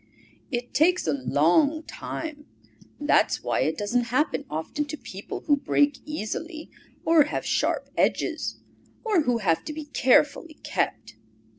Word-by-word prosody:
It 245 Hz, -2 st, -4 dB
takes 355 Hz, +4 st, +3 dB
a 155 Hz, -, +1 dB
long 165 Hz, -, +2 dB
time. 300 Hz, -2 st, -7 dB, 0.5 s
That's 295 Hz, +1 st, +2 dB
why -, -, 0 dB
it -, -, 0 dB
doesn't 235 Hz, +4 st, 0 dB
happen 280 Hz, +4 st, 0 dB
often 160 Hz, -, -3 dB
to 295 Hz, +1 st, -6 dB
people 195 Hz, -6 st, -7 dB
who 290 Hz, -, +3 dB
break 285 Hz, 0 st, +2 dB
easily, 310 Hz, +4 st, -5 dB, 0.3 s
or 320 Hz, -3 st, +6 dB
have 295 Hz, -, -3 dB
sharp -, -, 0 dB
edges, -, -, 0 dB, 0.5 s
or 425 Hz, -7 st, +3 dB
who 245 Hz, -1 st, +2 dB
have 180 Hz, -7 st, +1 dB
to 305 Hz, -, -4 dB
be 310 Hz, 0 st, -6 dB
carefully 290 Hz, +3 st, +2 dB
kept. -, -, -2 dB
290 Hz, 140 wpm, -26 LUFS, 235-310 Hz, 0.5 s, or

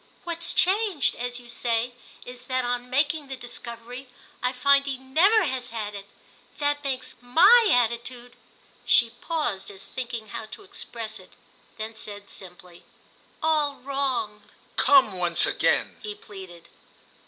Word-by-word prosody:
"What's 340 Hz, 0 st, -1 dB
changed, 385 Hz, -, +3 dB
as 245 Hz, 0 st, -4 dB
you 245 Hz, -, -15 dB
say, 235 Hz, 0 st, -1 dB, 0.3 s
is 250 Hz, 0 st, -9 dB
that 255 Hz, 0 st, 0 dB
on 245 Hz, 0 st, -2 dB
making 290 Hz, +3 st, +1 dB
the 270 Hz, -, -5 dB
discovery 245 Hz, +1 st, -8 dB, 0.3 s
I 250 Hz, -, +1 dB
find 275 Hz, +2 st, +4 dB
he 270 Hz, -2 st, -2 dB
never 330 Hz, -, +4 dB
has 260 Hz, -5 st, -2 dB
had 215 Hz, -2 st, -4 dB
it. 200 Hz, -1 st, -8 dB, 0.5 s
That 290 Hz, 0 st, 0 dB
makes 260 Hz, -2 st, -3 dB
my 390 Hz, -, +7 dB
attitude"—she 240 Hz, 0 st, 0 dB
paused 305 Hz, -, -2 dB
as 195 Hz, -1 st, -10 dB
thinking 235 Hz, -4 st, -5 dB
how 220 Hz, -, -6 dB
to 220 Hz, -, -10 dB
express 230 Hz, -, -6 dB
it, 185 Hz, -, -17 dB, 0.4 s
then 220 Hz, +1 st, -5 dB
said 205 Hz, -2 st, -8 dB
simply—"all 280 Hz, -, -4 dB
wrong." 260 Hz, -6 st, -2 dB, 0.3 s
"Come 265 Hz, -7 st, +5 dB
once 175 Hz, -1 st, +4 dB
again," -, -, +1 dB
he 420 Hz, -1 st, -5 dB
pleaded. 190 Hz, -, -12 dB
250 Hz, 130 wpm, -26 LUFS, 225-285 Hz, 0.5 s, my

